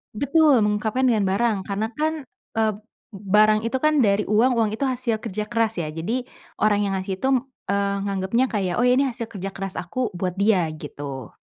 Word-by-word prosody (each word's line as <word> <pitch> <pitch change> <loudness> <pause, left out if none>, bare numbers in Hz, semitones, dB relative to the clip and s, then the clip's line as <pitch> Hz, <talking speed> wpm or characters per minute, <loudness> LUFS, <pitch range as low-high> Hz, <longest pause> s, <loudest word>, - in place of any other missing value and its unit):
Betul. 285 +2 +4
Mengungkapkan 215 +5 0
dengan 225 -5 +3
barang 215 +2 +1
karena 205 +2 -1
kan, 310 +3 0 0.4
eee, 220 -1 +2 0.4
barang 210 +2 +3
itu 245 +3 0
kan 305 -2 +3
dari 205 -1 +2
uang, 230 +5 +3
uang 225 -2 +2
itu 260 +5 -1
hasil 250 -3 -1
kerja 210 -1 -4
keras 230 -2 0
ya. 155 - -4
Jadi 215 +11 -3 0.4
orang 210 -1 +3
yang 195 - -1
ngasih 190 0 -4
itu, - - +1 0.4
eee, 200 0 +1
nganggepnya 200 +5 +1
kayak, 190 -5 -1
oh - - +3
ini 250 +3 +4
hasil 235 -3 -4
kerja 195 -2 -5
keras 195 -1 -6
aku 245 +8 -2
buat 180 0 -2
dia, 195 -2 +2
gitu. 140 -4 -7
215 Hz, 185 wpm, -23 LUFS, 195-245 Hz, 0.4 s, Betul